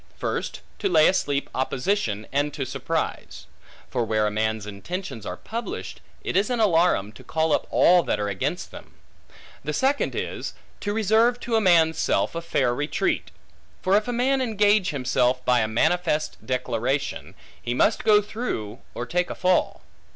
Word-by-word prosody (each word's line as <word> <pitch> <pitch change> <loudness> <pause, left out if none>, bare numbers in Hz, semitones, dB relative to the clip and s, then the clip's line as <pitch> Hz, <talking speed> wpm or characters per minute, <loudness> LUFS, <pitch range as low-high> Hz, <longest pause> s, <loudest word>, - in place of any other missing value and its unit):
First, - - -3 0.2
to 200 - 0
lay 160 -3 +6
asleep 145 -6 0
opposition, 130 - -1
and 145 +2 +1
to 135 - -2
surprise. - - -3 0.5
For 125 -2 0
where 110 -1 +1
a 105 - 0
man's 110 0 -1
intentions 110 - -6
are 90 - -5
published, 235 - -6 0.2
it - - -3
is 200 +4 +3
an 245 -2 0
alarum, 170 - +3
to - - -14
call 160 -1 0
up - - 0
all 180 0 +5
that 105 - -1
are 105 - -1
against 100 -2 -3
them. - - -12 0.7
The 150 +2 -3
second 270 - +1
is, - - -4 0.2
to 205 - -2
reserve 225 +3 +3
to 235 - -1
a 220 - +3
man's 165 -4 +4
self - - +1
a 170 - -3
fair 130 -7 +1
retreat. 145 +5 -1 0.5
For 190 +2 +3
if 210 +2 +2
a - - -1
man 260 +3 +1
engage 210 -4 +3
himself 125 -2 0
by 125 -1 +4
a 110 - +1
manifest 155 +6 0
declaration, 130 +2 -2 0.3
he 120 - -2
must 210 - +2
go 210 -1 +5
through 125 - -4 0.2
or 120 - -3
take 180 +6 0
a - - -4
fall. 185 -1 +1
160 Hz, 170 wpm, -24 LUFS, 120-205 Hz, 0.7 s, lay